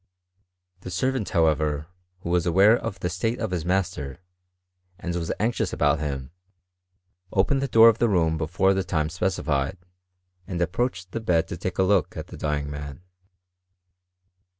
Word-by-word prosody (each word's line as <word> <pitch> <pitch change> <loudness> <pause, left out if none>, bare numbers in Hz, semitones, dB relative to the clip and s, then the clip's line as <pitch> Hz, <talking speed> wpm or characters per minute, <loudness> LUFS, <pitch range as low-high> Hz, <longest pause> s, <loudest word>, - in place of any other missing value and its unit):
The 90 - -8
servant, 130 +5 -1
hoKf 80 -2 +3
ever, 75 0 -2 0.3
who 85 - -4
was 90 0 +2
aware 95 +6 +6
of 115 -5 -5
the - - 0
state 110 +7 -1
of 110 -4 -3
his 90 -3 -2
master, 90 -6 -1 0.8
andwRH 85 -2 -3
anxious 115 +3 0
about 75 0 +2
him, 70 -3 -4 1.0
opened 135 +8 +2
the 140 - 0
door 115 -2 +7
of 115 -1 +4
the 120 - +3
room 80 -5 +2
befon^ 95 +5 +2
the 95 0 0
time 80 -3 -1
specified, 85 -3 -1 0.7
and 90 -3 -4
approached 95 +1 -1
the 115 - -3
bed 85 -7 +1
to - - -4
take, 90 +1 -4
a 95 - +4
look 95 -2 +3
atthe - - -7
dying 75 -1 -1
man. 75 +1 -7
90 Hz, 155 wpm, -25 LUFS, 80-95 Hz, 1.0 s, door